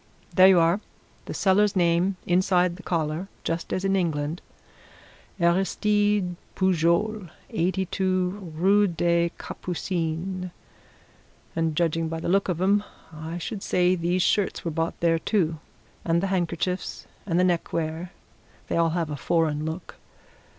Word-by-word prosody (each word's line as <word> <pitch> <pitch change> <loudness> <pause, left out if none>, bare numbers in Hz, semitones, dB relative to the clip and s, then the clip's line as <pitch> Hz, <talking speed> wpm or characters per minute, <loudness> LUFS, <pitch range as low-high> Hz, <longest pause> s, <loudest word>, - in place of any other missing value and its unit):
There 185 0 +8
you 190 -2 +6
are 170 +4 +3 0.5
the - - -5
seller's 205 +1 +3
name, 175 +2 +2
inside 180 0 +2
the 190 - -11
collar, 165 +1 -2 0.2
just 165 +1 -3
as 185 - -1
in 195 0 +2
England. 160 -3 -1 1.0
Aristide 195 +1 +2 0.2
Pujol, 185 +2 +1 0.2
82, 185 0 -1
Rue 200 +5 +4
des 170 0 +1
Capucines. 180 +1 -3 1.1
And 165 -1 0
judging 165 0 +1
by 165 0 -3
the 165 - -3
look 195 +1 +2
of 175 -2 -1
'em 200 +3 +3 0.3
I 160 +2 -6
should 195 +4 -5
say 180 -1 +2
these 175 +1 +1
shirts 205 -4 +1
were 165 - -1
bought 165 +1 -2
there, 165 -1 +3
too 165 -5 0 0.4
and 165 0 +2
the - - +1
handkerchiefs 180 +1 -2 0.2
and 175 -1 +1
the - - +4
neckwear 170 -1 -1 0.6
they - - 0
all 165 0 +3
have 165 -3 -1
a - - -2
foreign 155 +2 0
look. 160 +3 -6
175 Hz, 135 wpm, -25 LUFS, 165-190 Hz, 1.1 s, There